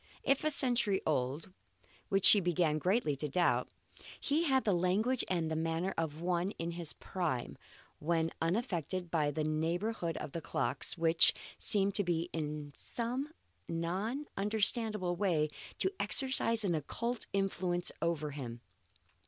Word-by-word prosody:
If 275 Hz, +1 st, +2 dB
a 310 Hz, -, +2 dB
century 240 Hz, -8 st, +2 dB
old 145 Hz, +5 st, -1 dB, 0.6 s
which 195 Hz, -1 st, +3 dB
she 210 Hz, -, +10 dB
began 170 Hz, -4 st, +1 dB
greatly 180 Hz, -, +1 dB
to 150 Hz, +2 st, -1 dB
doubt 175 Hz, +5 st, +1 dB, 0.5 s
he 310 Hz, +4 st, 0 dB
had 265 Hz, -3 st, +2 dB
the 205 Hz, -, +2 dB
language 195 Hz, +8 st, +1 dB
and 160 Hz, -3 st, -1 dB
manner 165 Hz, +4 st, -1 dB
of 160 Hz, -1 st, -3 dB
one 175 Hz, +1 st, 0 dB
in 170 Hz, +1 st, -3 dB
his 170 Hz, -3 st, -3 dB
prime, 165 Hz, -10 st, -3 dB, 0.4 s
when 165 Hz, +1 st, 0 dB
unaffected 180 Hz, -, -2 dB
by 155 Hz, -3 st, +1 dB
the 155 Hz, +2 st, -2 dB
neighbourhood 165 Hz, +4 st, -1 dB
of -, -, -6 dB
the 165 Hz, -, -5 dB
clocks, -, -, +1 dB
which 165 Hz, 0 st, +5 dB, 0.2 s
seemed 200 Hz, 0 st, +3 dB
in 160 Hz, -5 st, -2 dB
some 250 Hz, -, -3 dB, 0.4 s
non 190 Hz, -, -2 dB
understandable 210 Hz, -2 st, +1 dB
way 170 Hz, -5 st, +1 dB, 0.3 s
to 380 Hz, -, 0 dB
exercise 245 Hz, -4 st, +2 dB
an 180 Hz, -, +1 dB
occult 230 Hz, -, -3 dB
influence 180 Hz, -2 st, -1 dB
over 155 Hz, -3 st, -1 dB
him. 120 Hz, -4 st, -7 dB
175 Hz, 135 wpm, -33 LUFS, 160-210 Hz, 0.6 s, she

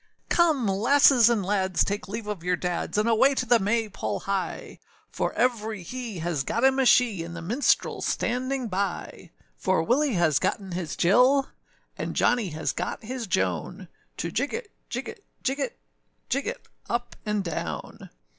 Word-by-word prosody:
] -, -, -42 dB
COME, 320 Hz, -8 st, +3 dB
lasses 240 Hz, +4 st, +5 dB
and 220 Hz, -5 st, +1 dB
lads, 190 Hz, -2 st, +1 dB
take 205 Hz, +1 st, -3 dB
leave 215 Hz, +3 st, -5 dB
of 205 Hz, -5 st, -5 dB
your 180 Hz, 0 st, +1 dB
dads, 180 Hz, +3 st, -3 dB
And 215 Hz, +2 st, +2 dB
away 235 Hz, +5 st, +4 dB
to 255 Hz, -, 0 dB
the 240 Hz, -1 st, +4 dB
may 220 Hz, +3 st, +1 dB
pole 110 Hz, -, -4 dB
hie; 195 Hz, -2 st, -3 dB, 0.3 s
For -, -, -1 dB
every 220 Hz, -5 st, 0 dB
he 240 Hz, 0 st, -6 dB
has 165 Hz, -4 st, -2 dB
got 230 Hz, -, -2 dB
him 265 Hz, 0 st, +4 dB
a 265 Hz, -, +4 dB
she, 230 Hz, -9 st, +4 dB
And 170 Hz, 0 st, -8 dB
the 165 Hz, -, -6 dB
minstrelâs 235 Hz, +12 st, +1 dB
standing 255 Hz, +1 st, -1 dB
by; 190 Hz, -2 st, -3 dB, 0.3 s
For 185 Hz, -3 st, +1 dB
Willie 260 Hz, -, +2 dB
has 165 Hz, -5 st, +3 dB
gotten 195 Hz, -2 st, -2 dB
his 175 Hz, -3 st, -4 dB
Jill, 250 Hz, +9 st, +4 dB, 0.5 s
And -, -, -3 dB
Johnny 240 Hz, -6 st, +2 dB
has 160 Hz, 0 st, -2 dB
got -, -, -4 dB
his 245 Hz, 0 st, -5 dB
Joan, 95 Hz, -, -2 dB, 0.3 s
To -, -, -3 dB
jig -, -, -1 dB
it, -, -, -6 dB, 0.2 s
jig -, -, -4 dB
it, -, -, -9 dB, 0.2 s
jig -, -, -1 dB
it, -, -, -3 dB, 0.5 s
Jig -, -, -1 dB
it -, -, -5 dB, 0.2 s
up 240 Hz, +2 st, -2 dB
and 210 Hz, -2 st, -1 dB
down. 170 Hz, -, -5 dB
210 Hz, 175 wpm, -26 LUFS, 180-245 Hz, 0.5 s, lasses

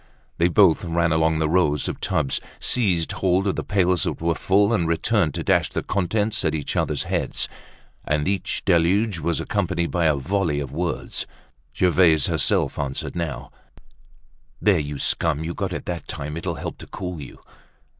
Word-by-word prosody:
They 85 Hz, -, +4 dB
both 90 Hz, -2 st, +4 dB
ran 85 Hz, -1 st, +1 dB
along 80 Hz, 0 st, +2 dB
the 80 Hz, 0 st, +1 dB
rows 75 Hz, -4 st, +2 dB
of -, -, -4 dB
tubs, 70 Hz, -3 st, 0 dB, 0.2 s
seized 95 Hz, -9 st, +1 dB
hold 95 Hz, +1 st, +1 dB
of 100 Hz, -, 0 dB
the -, -, -3 dB
pails 90 Hz, -4 st, +2 dB
that -, -, -1 dB
were 85 Hz, 0 st, +1 dB
full, 100 Hz, +5 st, +2 dB
and 90 Hz, -7 st, +1 dB
returned 85 Hz, 0 st, +1 dB
to -, -, -3 dB
dash -, -, +2 dB
the -, -, -3 dB
contents 105 Hz, +3 st, 0 dB
at 80 Hz, -2 st, +1 dB
each 75 Hz, -3 st, -3 dB
other's -, -, 0 dB
heads. -, -, -1 dB, 0.6 s
And 75 Hz, +1 st, 0 dB
each 95 Hz, -1 st, -1 dB
deluge 95 Hz, +3 st, +2 dB
was 80 Hz, +1 st, -1 dB
accompanied 85 Hz, 0 st, -1 dB
by 85 Hz, -2 st, +1 dB
a 75 Hz, -2 st, +4 dB
volley 80 Hz, +1 st, 0 dB
of 70 Hz, -3 st, -5 dB
words. 85 Hz, +4 st, -3 dB, 0.5 s
Gervaise 85 Hz, -4 st, +4 dB
herself -, -, +1 dB
answered 70 Hz, +2 st, -3 dB
now: 70 Hz, -6 st, -4 dB, 1.1 s
"There, 100 Hz, -5 st, +3 dB
you 75 Hz, -1 st, -4 dB
scum! 80 Hz, +1 st, +1 dB
You 85 Hz, +1 st, -3 dB
got -, -, -3 dB
it -, -, -5 dB
that 85 Hz, -4 st, -5 dB
time. 75 Hz, +2 st, -5 dB
It'll 85 Hz, 0 st, -3 dB
help 70 Hz, -, -6 dB
to -, -, -10 dB
cool 90 Hz, -4 st, -6 dB
you." 70 Hz, -, -10 dB
85 Hz, 175 wpm, -23 LUFS, 75-95 Hz, 1.1 s, They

